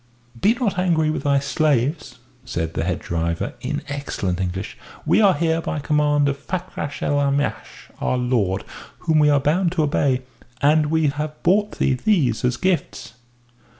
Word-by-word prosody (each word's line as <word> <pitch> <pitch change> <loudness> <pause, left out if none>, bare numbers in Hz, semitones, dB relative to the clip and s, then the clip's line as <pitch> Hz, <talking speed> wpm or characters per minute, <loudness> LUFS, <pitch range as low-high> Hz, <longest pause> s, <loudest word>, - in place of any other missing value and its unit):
"Be 220 +4 +4
not 220 -7 -1
angry 160 -4 +2
with - - -3
thy 140 -1 +3
slaves!" 140 +1 0 0.3
said 85 -10 -3
the - - -1
head 90 -1 0
driver, 85 0 -2
in - - -3
excellent 100 -10 -3
English. 95 +1 -4 0.3
"We - - +4
are 195 -3 +5
here 165 +1 +1
by 155 - -3
command 145 -1 +2
of 140 0 -1
Fakrash 180 -5 -5
el 145 0 +1
Aamash, 140 0 -2
our 125 - 0
lord, 120 -7 0 0.4
whom 160 -1 +2
we 150 0 +5
are 145 -1 +4
bound 165 +5 +1
to 165 -4 +1
obey. 135 -3 +1 0.4
And 150 +2 +3
we 160 -1 +2
have 150 +1 -5
brought 205 +4 +2
thee 135 - +2
these 130 - +1
as 125 -1 +1
gifts." 180 -3 -2
145 Hz, 165 wpm, -22 LUFS, 130-160 Hz, 0.4 s, are